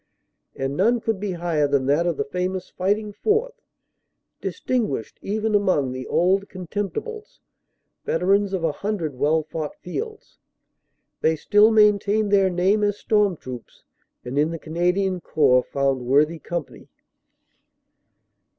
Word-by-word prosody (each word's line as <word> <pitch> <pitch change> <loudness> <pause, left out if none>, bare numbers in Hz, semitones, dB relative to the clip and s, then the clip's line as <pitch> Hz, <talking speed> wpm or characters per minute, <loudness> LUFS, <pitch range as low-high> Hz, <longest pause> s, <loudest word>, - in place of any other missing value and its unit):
And 135 +1 -3
none 230 +8 +3
could 220 -3 -2
be 200 -2 -3
higher 165 -4 0
than 140 -2 +1
that 150 +6 +2
of 170 -4 -1
the - - 0
famous 180 +4 -3
"Fighting 205 +3 -1
Fourth," 465 - -1 0.8
distin 250 -3 -1
guished 115 -6 -5
even 215 +2 -1
among 185 -10 +2
the 130 0 -6
"Old 195 +3 +2
Contemptibles," 210 - -5 0.6
veterans 195 +4 +1
of 190 -3 -2
a 165 - +2
hundred 185 -4 -3
well 155 +5 +1
fought 155 0 -5
fields. 435 - -7 0.8
They 160 0 +3
still 210 +7 +4
maintained 210 -1 +3
their 195 -2 +4
name 190 +4 +2
as 205 0 +1
"storm 205 -5 +1
troops," 125 -4 -10 0.4
and 130 +3 -2
in 150 +2 +2
the 165 - -4
Canadian 180 +3 0
Corps 135 -6 +3
found 135 0 -1
worthy 150 +6 +2
company. 170 -2 -6
185 Hz, 135 wpm, -23 LUFS, 155-205 Hz, 0.8 s, still